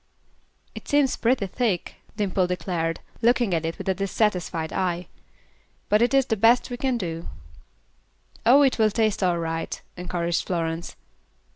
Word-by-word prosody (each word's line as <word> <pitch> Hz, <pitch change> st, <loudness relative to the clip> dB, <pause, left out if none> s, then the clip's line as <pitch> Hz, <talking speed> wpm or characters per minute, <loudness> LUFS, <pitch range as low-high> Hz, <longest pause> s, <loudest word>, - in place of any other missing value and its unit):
"It -, -, -10 dB
seems 290 Hz, -2 st, +3 dB
pretty 235 Hz, -2 st, +1 dB
thick," 195 Hz, -2 st, -2 dB, 0.2 s
Dimple 190 Hz, -3 st, +1 dB
declared, 170 Hz, -2 st, -2 dB, 0.2 s
looking 240 Hz, -4 st, +3 dB
at 165 Hz, -1 st, 0 dB
it 165 Hz, -, -4 dB
with -, -, -8 dB
a 190 Hz, -, +3 dB
dissatisfied 185 Hz, -4 st, -1 dB
eye; 180 Hz, -1 st, -1 dB, 0.8 s
"but 210 Hz, +1 st, +4 dB
it 240 Hz, -, +3 dB
is 270 Hz, -2 st, +4 dB
the 225 Hz, -, 0 dB
best 235 Hz, +4 st, +3 dB
we 245 Hz, -, -3 dB
can 260 Hz, -1 st, 0 dB
do." 165 Hz, -5 st, -4 dB, 1.2 s
"Oh, 265 Hz, +5 st, +6 dB
it 265 Hz, -3 st, +2 dB
will 215 Hz, -1 st, +5 dB
taste 215 Hz, -1 st, 0 dB
all 180 Hz, -2 st, +2 dB
right," 165 Hz, -1 st, -3 dB, 0.2 s
encouraged 175 Hz, -1 st, -2 dB
Florence. 165 Hz, -1 st, -3 dB
190 Hz, 150 wpm, -24 LUFS, 170-235 Hz, 1.2 s, Oh